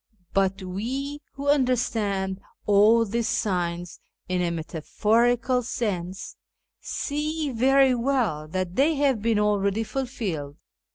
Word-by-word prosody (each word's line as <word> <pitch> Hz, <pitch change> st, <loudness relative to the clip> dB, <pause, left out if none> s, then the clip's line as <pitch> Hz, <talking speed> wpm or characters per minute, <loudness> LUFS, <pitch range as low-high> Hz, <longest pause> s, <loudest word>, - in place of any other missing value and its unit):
But 195 Hz, 0 st, +1 dB
we, 260 Hz, +10 st, -4 dB
who 280 Hz, +1 st, -6 dB
understand 220 Hz, -8 st, +1 dB, 0.2 s
all 215 Hz, +3 st, +5 dB
these 230 Hz, +2 st, -1 dB
signs 175 Hz, -3 st, -2 dB, 0.3 s
in 185 Hz, 0 st, 0 dB
a 175 Hz, -, +1 dB
metaphorical 225 Hz, -, +1 dB
sense, 195 Hz, -7 st, -4 dB, 0.4 s
see 300 Hz, 0 st, -2 dB
very 265 Hz, +2 st, +4 dB
well 235 Hz, -, 0 dB
that 185 Hz, +2 st, -3 dB
they 300 Hz, +6 st, +3 dB
have 275 Hz, -6 st, +2 dB
been 225 Hz, 0 st, +2 dB
already 210 Hz, 0 st, +1 dB
fulfilled. 210 Hz, -, -4 dB
220 Hz, 110 wpm, -25 LUFS, 185-260 Hz, 0.4 s, all